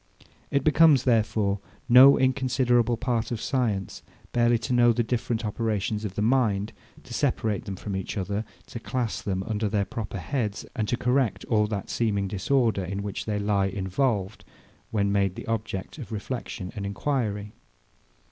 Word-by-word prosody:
It 140 Hz, -1 st, +1 dB
becomes, 155 Hz, -3 st, +5 dB
therefore, 110 Hz, -4 st, +1 dB, 0.3 s
no 130 Hz, +3 st, +9 dB
inconsiderable 125 Hz, -3 st, +2 dB
part 115 Hz, -1 st, -1 dB
of 120 Hz, -, -3 dB
science 110 Hz, -9 st, -1 dB, 0.3 s
barely 120 Hz, 0 st, +3 dB
to 125 Hz, +3 st, -3 dB
know 120 Hz, -1 st, +5 dB
the 120 Hz, +1 st, +1 dB
different 115 Hz, -1 st, -2 dB
operations 105 Hz, 0 st, -1 dB
of 100 Hz, -3 st, -4 dB
the 105 Hz, -, 0 dB
mind, 110 Hz, -4 st, +1 dB, 0.3 s
to -, -, -10 dB
separate 105 Hz, -3 st, 0 dB
them 100 Hz, -, -4 dB
from 100 Hz, +1 st, -5 dB
each 95 Hz, +2 st, -4 dB
other, 100 Hz, +2 st, -2 dB, 0.2 s
to 115 Hz, -, -7 dB
class 120 Hz, -1 st, -2 dB
them 95 Hz, -1 st, -2 dB
under 110 Hz, -1 st, -1 dB
their 100 Hz, -1 st, +1 dB
proper 100 Hz, 0 st, -5 dB
heads, 105 Hz, -, -3 dB
and 110 Hz, -4 st, -1 dB
to 120 Hz, -, 0 dB
correct 125 Hz, -4 st, +1 dB
all 105 Hz, -2 st, +2 dB
that 100 Hz, -2 st, -4 dB
seeming 100 Hz, -4 st, 0 dB
disorder, 105 Hz, +2 st, +1 dB
in 100 Hz, +2 st, -4 dB
which 100 Hz, -2 st, -4 dB
they 105 Hz, -2 st, -1 dB
lie 100 Hz, -1 st, +1 dB
involved, 100 Hz, +2 st, -1 dB, 0.5 s
when 100 Hz, -2 st, +1 dB
made 100 Hz, -2 st, +1 dB
the -, -, -7 dB
object 110 Hz, +2 st, -4 dB
of 125 Hz, -, -8 dB
reflexion 110 Hz, -3 st, -5 dB
and 100 Hz, -2 st, -4 dB
enquiry. 105 Hz, -2 st, -2 dB
110 Hz, 165 wpm, -26 LUFS, 100-120 Hz, 0.5 s, no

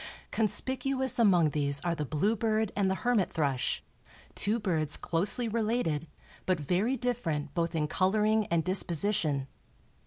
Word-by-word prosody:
Conspicuous 260 Hz, +4 st, +1 dB
among 180 Hz, -9 st, +4 dB
these 140 Hz, -1 st, +1 dB
are 175 Hz, -1 st, 0 dB
the 150 Hz, -3 st, -3 dB
bluebird 215 Hz, -, 0 dB
and 200 Hz, -2 st, +1 dB
the 190 Hz, -, +1 dB
hermit 240 Hz, -6 st, +2 dB
thrush, 140 Hz, -5 st, -1 dB, 0.5 s
two 215 Hz, +3 st, 0 dB
birds 160 Hz, -8 st, 0 dB
closely 200 Hz, +8 st, -1 dB
related, 215 Hz, -9 st, -1 dB, 0.4 s
but 185 Hz, -3 st, +2 dB
very 190 Hz, -, 0 dB
different 165 Hz, -, -2 dB
both 170 Hz, -1 st, -1 dB
in 150 Hz, -2 st, 0 dB
coloring 210 Hz, +5 st, +2 dB
and 165 Hz, -1 st, +1 dB
disposition. 170 Hz, -5 st, 0 dB
190 Hz, 130 wpm, -30 LUFS, 155-220 Hz, 0.5 s, among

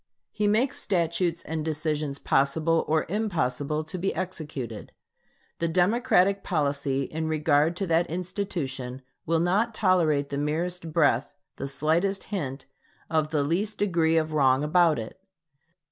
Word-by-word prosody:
He 210 Hz, -1 st, 0 dB
makes 225 Hz, +6 st, +1 dB
statutes 170 Hz, -2 st, 0 dB
and 160 Hz, 0 st, -3 dB
decisions 150 Hz, -2 st, -2 dB
possible 155 Hz, +5 st, +2 dB
or 155 Hz, 0 st, +1 dB
impossible 155 Hz, -, -1 dB
to 180 Hz, +4 st, -6 dB
be 195 Hz, +3 st, -1 dB
executed. 150 Hz, -, -5 dB, 0.7 s
The 170 Hz, -, +1 dB
Democratic 195 Hz, +2 st, +2 dB
policy 140 Hz, -4 st, 0 dB
in 160 Hz, +3 st, -4 dB
regard 155 Hz, +1 st, +2 dB
to 195 Hz, -, -2 dB
that 170 Hz, 0 st, +2 dB
institution 150 Hz, -8 st, -4 dB, 0.2 s
will 165 Hz, 0 st, +2 dB
not 205 Hz, +7 st, +1 dB
tolerate 160 Hz, -9 st, +2 dB
the 140 Hz, -, -2 dB
merest 165 Hz, +3 st, -2 dB
breath, 145 Hz, -5 st, +2 dB, 0.2 s
the -, -, -4 dB
slightest 165 Hz, +8 st, 0 dB
hint, 135 Hz, -8 st, -3 dB, 0.5 s
of 155 Hz, -1 st, +1 dB
the 150 Hz, -2 st, +1 dB
least 190 Hz, +8 st, -1 dB
degree 165 Hz, -5 st, +2 dB
of 155 Hz, -1 st, 0 dB
wrong 135 Hz, -2 st, +3 dB
about 165 Hz, 0 st, +4 dB
it. 115 Hz, +10 st, -7 dB
160 Hz, 135 wpm, -26 LUFS, 145-180 Hz, 0.7 s, about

